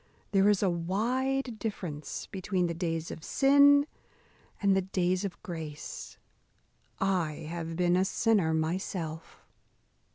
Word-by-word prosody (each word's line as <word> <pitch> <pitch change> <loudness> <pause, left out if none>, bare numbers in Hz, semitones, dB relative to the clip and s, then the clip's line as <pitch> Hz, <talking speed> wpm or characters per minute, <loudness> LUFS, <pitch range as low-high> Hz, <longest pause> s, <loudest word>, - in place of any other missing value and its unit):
There 195 0 +4
is 205 -1 +2
a 195 - +3
wide 235 +8 -1
difference 175 -9 -5
between 185 -1 -1
the 170 - -1
days 165 -1 -3
of 155 - -8
sin 285 +1 +5 0.7
and 200 -1 +3
the 190 - +3
days 185 0 0
of 195 -3 -5
grace. 160 -4 -7 0.8
I 180 -5 +1
have 165 0 -5
been 175 0 +2
a 185 - +3
sinner 195 -4 +2
myself." 160 0 -3
185 Hz, 125 wpm, -30 LUFS, 165-205 Hz, 0.8 s, sin